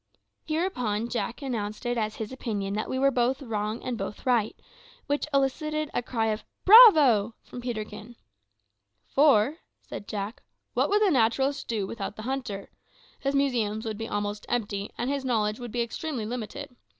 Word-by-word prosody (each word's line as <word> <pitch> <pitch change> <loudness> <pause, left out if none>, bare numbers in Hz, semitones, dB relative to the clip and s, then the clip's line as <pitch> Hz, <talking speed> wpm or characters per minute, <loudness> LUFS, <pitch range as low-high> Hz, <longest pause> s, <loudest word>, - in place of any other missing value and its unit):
Hereupon 250 - -1
Jack 235 +3 -3
announced 215 -4 -4
it 240 0 0
as 215 -2 -1
his 220 0 -5
opinion 205 -6 -3
that 215 +1 -2
we 260 - -1
were 275 +1 +4
both 250 +1 +1
wrong 220 -4 -3
and 250 -3 -3
both 195 +5 -6
right; 235 -4 +2 0.5
which 290 +1 -1
elicited 305 +2 0
a - - 0
cry 230 -2 -1
of 215 0 -2 0.2
"Bravo!" 300 - +8
from 245 - -9
Peterkin. 230 -1 -6 0.9
"For," 280 +1 +4 0.2
said 205 - -8
Jack, 210 +6 -4 0.3
"what - - +2
would 415 +1 +3
the 395 - +4
naturalist 265 +2 +1
do 215 -4 -1
without 200 0 -5
the 215 - -8
hunter? 245 -6 -4 0.5
His 275 0 -1
museums 235 -6 0
would 220 -1 -4
be 225 - -3
almost 205 0 -3
empty 205 -4 -2
and 240 - -2
his 280 0 -1
knowledge 220 -4 0
would 240 -2 -7
be 240 +1 0
extremely 240 0 -4
limited. 240 +1 -6
240 Hz, 165 wpm, -27 LUFS, 215-270 Hz, 0.9 s, Bravo